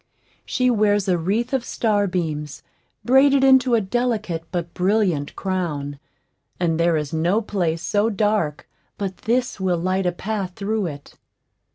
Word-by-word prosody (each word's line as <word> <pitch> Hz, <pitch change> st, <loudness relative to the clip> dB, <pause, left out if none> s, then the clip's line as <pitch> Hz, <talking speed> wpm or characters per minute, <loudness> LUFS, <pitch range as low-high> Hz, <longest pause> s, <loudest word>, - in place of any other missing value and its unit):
She 255 Hz, -1 st, +2 dB
wears 205 Hz, -3 st, +2 dB
a 185 Hz, -, +3 dB
wreath 210 Hz, +10 st, -1 dB
of 265 Hz, -3 st, +1 dB
starbeams, 180 Hz, -, -1 dB, 0.4 s
braided 270 Hz, +2 st, +5 dB
into 265 Hz, -2 st, +5 dB
a 225 Hz, -, +2 dB
delicate 215 Hz, -5 st, -1 dB
but 170 Hz, -1 st, -3 dB
brilliant 185 Hz, -6 st, 0 dB
crown; 150 Hz, -7 st, -3 dB, 0.6 s
and 165 Hz, -2 st, 0 dB
there 170 Hz, -1 st, +3 dB
is 150 Hz, -1 st, -4 dB
no 170 Hz, +6 st, +2 dB
place 175 Hz, -7 st, -2 dB
so 210 Hz, +1 st, +1 dB
dark 205 Hz, -8 st, 0 dB, 0.3 s
but 195 Hz, -2 st, -3 dB
this 245 Hz, -2 st, +1 dB
will 185 Hz, -2 st, +1 dB
light 185 Hz, +2 st, 0 dB
a -, -, +2 dB
path 195 Hz, 0 st, -4 dB
through 205 Hz, -1 st, -1 dB
it. 145 Hz, -3 st, -9 dB
190 Hz, 145 wpm, -22 LUFS, 170-220 Hz, 0.6 s, braided